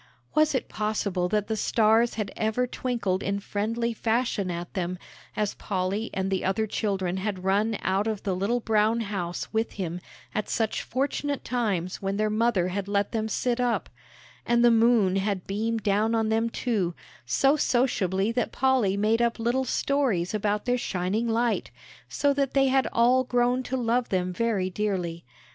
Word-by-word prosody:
Was 305 -2 +3
it 260 - -1
possible 200 -4 -1
that 210 0 +1
the 220 - -1
stars 225 +2 +3
had 215 -3 -3
ever 220 +3 0
twinkled 235 -7 -2
in 200 +1 -1
friendly 230 +4 -2
fashion 225 -3 0
at 175 0 -5
them, 180 -1 -2 0.4
as 210 -1 0
Polly 195 +3 -2
and 190 0 -2
the 190 - 0
other 195 +4 +1
children 190 -4 -1
had 190 -1 -3
run 205 +3 +1
out 195 +3 +1
of 215 -2 -3
the 195 -3 -1
little 205 +6 0
brown 220 +1 +2
house 190 -5 -4
with 220 +1 0
him 180 -2 -4 0.3
at 215 - -2
such 220 -2 0
fortunate 280 +2 -2
times 200 -8 -1
when 195 0 -2
their 215 0 +1
mother 215 -5 +2
had 195 +1 -3
let 200 0 0
them 220 -2 -1
sit 245 +2 0
up; 245 -2 0 0.5
and 235 0 +3
the 240 - +7
moon 225 -4 +4
had 195 -2 -1
beamed 220 +2 -2
down 215 +3 +2
on 220 -1 +1
them 225 +1 +1
too, 205 -8 -1 0.3
so 275 +1 +3
sociably 225 - +1
that 240 0 -1
Polly 255 -7 +2
made 220 +3 +2
up 235 -1 +1
little 240 +3 0
stories 250 -10 0
about 210 0 -1
their 245 0 +1
shining 195 +3 -1
light, 230 +1 0 0.4
so 285 -1 +2
that 275 -1 -1
they 270 -1 +4
had 265 0 +2
all 245 +2 +4
grown 245 0 +1
to 260 +1 -3
love 240 0 0
them 180 -1 0
very 210 -2 0
dearly. 180 -5 -2
215 Hz, 175 wpm, -26 LUFS, 195-235 Hz, 0.5 s, the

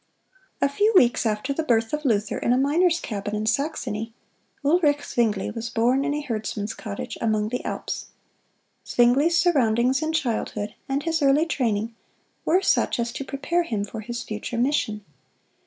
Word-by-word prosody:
A - - +5
few 410 +11 +2
weeks 240 -7 +5
after 215 +6 -1
the 320 - -1
birth 225 -5 +1
of 300 0 -2
Luther 210 -4 +1
in - - 0
a - - +3
miner's 330 +6 +3
cabin 205 -5 -4
in 210 +1 -2
Saxony, 230 -3 -2 0.5
Ulric 295 -2 +3
Zwingle 215 -5 0
was 230 0 -4
born 245 +5 +2
in 290 - 0
a 295 - -2
herdsman's 220 -4 -3
cottage 205 -2 -6
among 215 -2 +1
the 250 - -3
Alps. - - -4 0.8
Zwingle's 270 +8 +3
surroundings 255 -6 +3
in 315 0 -1
childhood, 225 -8 -2 0.2
and 275 +2 0
his 325 0 0
early 285 +3 +4
training, 230 -7 -1 0.5
were 365 +4 +3
such - - +2
as 235 0 -1
to 275 - -5
prepare 285 +6 -1
him 220 -11 -2
for 220 +2 -7
his 235 +2 -5
future 215 +2 -5
mission. 235 -5 0
245 Hz, 165 wpm, -24 LUFS, 220-295 Hz, 0.8 s, A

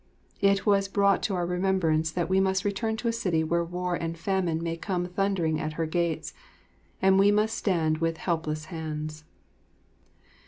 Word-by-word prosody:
It 200 -1 +3
was 200 -2 +3
brought 200 0 +2
to 200 - -1
our 175 -1 0
remembrance 180 -3 +1
that 175 +1 -1
we 190 +1 +2
must 190 +1 +1
return 220 +2 -1
to 235 - -3
a 230 - +1
city 180 -8 0
where 170 +2 +1
war 180 +1 -3
and 165 -1 -3
famine 175 -2 -1
may 165 0 -2
come 180 +1 -2
thundering 180 -3 0
at 155 0 -3
her 165 +1 -1
gates, 170 0 -1 0.7
and 190 0 +5
we 200 +1 +6
must 210 +2 +2
stand 160 -5 0
with 165 0 0
helpless 155 -3 -2
hands. 155 -1 -5
180 Hz, 170 wpm, -27 LUFS, 160-195 Hz, 0.7 s, we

